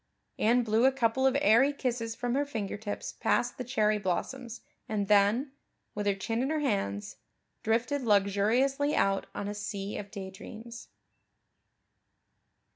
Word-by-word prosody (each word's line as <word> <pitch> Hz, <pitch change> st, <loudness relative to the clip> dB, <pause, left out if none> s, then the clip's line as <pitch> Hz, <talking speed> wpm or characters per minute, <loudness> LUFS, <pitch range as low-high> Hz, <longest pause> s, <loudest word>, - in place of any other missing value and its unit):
Anne 240 Hz, +3 st, +3 dB
blew 225 Hz, +2 st, +2 dB
a 265 Hz, -, +6 dB
couple 265 Hz, 0 st, +2 dB
of 265 Hz, +1 st, +2 dB
airy 265 Hz, +2 st, +5 dB
kisses 240 Hz, -5 st, -3 dB
from 245 Hz, -1 st, -2 dB
her 280 Hz, +2 st, +2 dB
fingertips 210 Hz, -5 st, -4 dB
past 245 Hz, +1 st, 0 dB
the -, -, -2 dB
cherry 215 Hz, -4 st, +1 dB
blossoms 230 Hz, +6 st, -3 dB, 0.3 s
and 205 Hz, -2 st, -1 dB
then, 210 Hz, +7 st, +3 dB, 0.4 s
with 205 Hz, 0 st, -3 dB
her 200 Hz, -, +2 dB
chin 225 Hz, +4 st, -2 dB
in 265 Hz, -, 0 dB
her 315 Hz, -, 0 dB
hands, 150 Hz, -, -2 dB, 0.4 s
drifted 235 Hz, +5 st, 0 dB
luxuriously 230 Hz, +7 st, +2 dB
out 195 Hz, 0 st, +1 dB
on 200 Hz, -, -3 dB
a 205 Hz, -, -3 dB
sea 205 Hz, -1 st, -4 dB
of 200 Hz, -, -8 dB
daydreams. 220 Hz, +4 st, -9 dB
225 Hz, 140 wpm, -29 LUFS, 205-255 Hz, 0.4 s, a